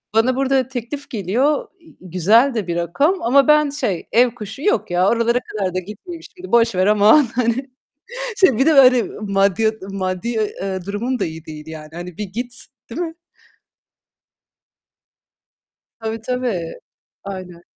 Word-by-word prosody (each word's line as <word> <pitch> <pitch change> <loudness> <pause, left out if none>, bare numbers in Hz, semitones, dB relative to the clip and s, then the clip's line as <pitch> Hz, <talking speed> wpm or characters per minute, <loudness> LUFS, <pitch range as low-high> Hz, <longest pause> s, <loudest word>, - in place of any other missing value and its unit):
Bana 245 +3 +3
burada 265 -1 +1
teklif 265 +3 -6
geliyor. 240 - 0
İii, 325 - -20
güzel 205 - +3
de 210 -6 -3
bir 170 - -2
rakam 275 - +1
ama 270 +3 +4
ben 300 -1 +5
şey, 210 - -3
ev 240 +1 +4
kuşu. 220 +2 -8
"Yok 415 - 0
ya, 180 +2 +3
oralara 235 +1 +2
kadar 195 -6 -4
da 185 - +1
gitmeyeyim 215 - -9
şimdi. 370 0 -12
Boş 230 -3 +4
ver 185 +2 +2
aman." 210 +7 +6
Hani, 250 +2 0 0.7
şey, 275 - +4
bir 270 - +3
de 320 - +5
böyle 255 -3 +7 0.2
maddiya 200 +1 +2 0.2
maddi, 185 +2 -3
eee, 195 -4 -2
durumum 235 +6 -2
da - - 0
iyi 160 -1 -7
değil 155 -1 -9
yani. 155 -1 -9
Hani 175 0 -8
bir 210 - -3
git, 240 +6 -6 0.3
değil 315 - -5
mi? 330 -2 -3 2.9
Tabii 225 0 -4
tabii. 235 -9 -3 0.4
Aynen. 185 -3 -8
225 Hz, 150 wpm, -20 LUFS, 185-260 Hz, 2.9 s, böyle